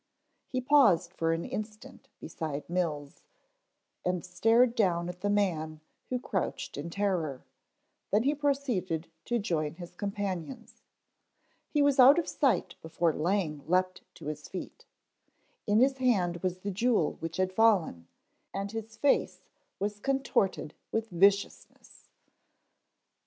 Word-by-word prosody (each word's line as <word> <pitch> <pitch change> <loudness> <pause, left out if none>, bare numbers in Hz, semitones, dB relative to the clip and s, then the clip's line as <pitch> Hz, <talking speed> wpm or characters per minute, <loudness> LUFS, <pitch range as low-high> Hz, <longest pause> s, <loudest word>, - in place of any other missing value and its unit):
He 255 - -2
paused 215 - +4
for 165 -2 0
an 165 +1 -1
instant 215 0 -7
beside 155 -2 -5
Mills, 155 -5 -3 0.8
and 180 -1 -1
stared 225 +6 +3
down 175 -7 +1
at 180 0 -8
the 205 - 0
man 165 -7 0 0.3
who 255 - 0
crouched 195 -6 -3
in 145 +4 -5
terror, 170 -8 -1 0.7
then 210 +3 +2
he 280 +3 +2
proceeded 255 - -1
to 240 - 0
join 160 -8 -1
his 175 0 -10
companions. 200 +3 -5 0.9
He 295 - +2
was 285 -1 +2
out 270 +4 +9
of 340 - 0
sight 275 -5 +1
before 165 0 0
Lang 160 -3 -1
leaped 185 +1 +1
to - - -12
his 150 0 -5
feet. 185 - -8 0.8
In 205 0 +3
his 265 +3 +3
hand 190 -9 +2
was 185 0 -2
the 200 - -3
jewel 210 -4 +1
which 165 0 -5
had 185 0 0
fallen, 185 - +2 0.5
and 200 0 -3
his 225 0 -7
face 280 +4 +1 0.3
was 205 +1 -3
contorted 265 - 0 0.2
with 225 -1 -2
viciousness. 195 +3 0
190 Hz, 130 wpm, -29 LUFS, 170-225 Hz, 0.9 s, out